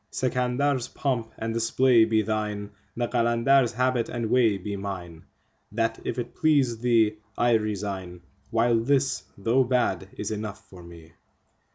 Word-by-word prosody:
Sikandar's3 130 +1 -1
pomp 120 -5 -1
and 115 0 -3
display 115 +1 +4
be 110 -1 +2
thine, 105 -1 -3 0.3
the 120 0 0
Qalandar's4 120 +2 +2
habit 125 0 0
and 115 -2 -3
way 115 -5 +4
be 100 +2 -5
mine; 90 -5 -7 0.5
That, 115 +1 -1
if - - -3
it 120 - -4
please 140 -8 +2
thee, 115 -3 +2 0.2
I 120 0 +3
resign, 100 -5 -2 0.3
while 115 0 +2
this, 135 +3 +1 0.2
though 115 +6 +2
bad, 120 -7 0
is 105 - -4
enough 105 -1 -6
for 90 -2 -13
me. 85 -1 -13
115 Hz, 145 wpm, -26 LUFS, 105-125 Hz, 0.5 s, display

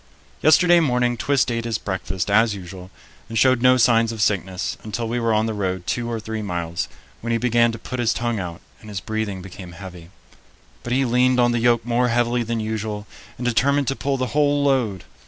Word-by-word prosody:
Yesterday 175 +2 +6
morning 125 -5 +1
Twist 135 +1 +1
ate 115 0 -2
his 115 -2 -1
breakfast 95 -1 -3
as 110 0 +4
usual 90 -1 -9 0.4
and 115 - -3
showed 130 -1 +4
no 130 0 +5
signs 115 -2 +4
of 115 - -7
sickness 95 -2 -1
until 110 +2 -4
we 120 +2 -1
were 115 -1 +1
on 110 0 +2
the 110 - -2
road 95 -3 -3
two 120 +4 -2
or 115 -1 -2
three 110 0 -5
miles, 85 -4 -3 0.3
when 115 - -6
he 115 - +2
began 120 -1 +3
to 115 - -6
put 130 +3 -6
his 120 -2 +2
tongue 120 -2 -1
out 85 -2 -6 0.2
and 110 - -13
his 100 -2 -4
breathing 105 -3 -4
became 90 -1 -10
heavy. 90 -2 -10 0.7
But 120 - -6
he 135 +1 +2
leaned 125 +1 +3
on 120 0 +4
the 120 - 0
yoke 120 0 +2
more 120 +1 +1
heavily 120 0 +1
than 115 0 -2
usual 110 -1 -3 0.3
and 125 - -5
determined 140 +3 +2
to 135 - -1
pull 140 0 -1
the 130 - -1
whole 145 -1 +2
load. 120 -10 +1
115 Hz, 210 wpm, -22 LUFS, 100-125 Hz, 0.7 s, Yesterday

